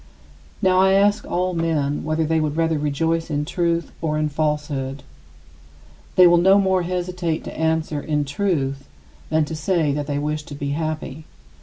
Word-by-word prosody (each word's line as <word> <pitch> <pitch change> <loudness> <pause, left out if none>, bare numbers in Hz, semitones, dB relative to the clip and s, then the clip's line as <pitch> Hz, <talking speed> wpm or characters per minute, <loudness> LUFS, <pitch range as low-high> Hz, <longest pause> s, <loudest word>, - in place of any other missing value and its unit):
Now 185 -1 +4
I 190 0 +5
ask 205 +2 +2
all 180 +1 0
men 155 -4 -1
whether 155 +1 0
they 160 +1 +1
would 155 0 -1
rather 165 -2 +1
rejoice 160 +3 -1
in 145 0 -1
truth 170 0 -1
or 155 -2 -1
in 155 0 0
falsehood. 145 -3 -2 1.1
They 180 - +8
will 175 0 +6
no 190 +3 +6
more 190 -2 +2
hesitate 175 -2 -2
to - - -8
answer, 160 -2 0
"In 150 -1 -1
truth," 140 -4 -1 0.4
than 155 -1 +2
to 160 - -5
say 155 -1 +1
that 145 0 -3
they 145 -1 -1
wish 150 +1 -2
to 145 - -8
be 140 0 -4
happy. 155 0 -4
160 Hz, 170 wpm, -22 LUFS, 150-175 Hz, 1.1 s, They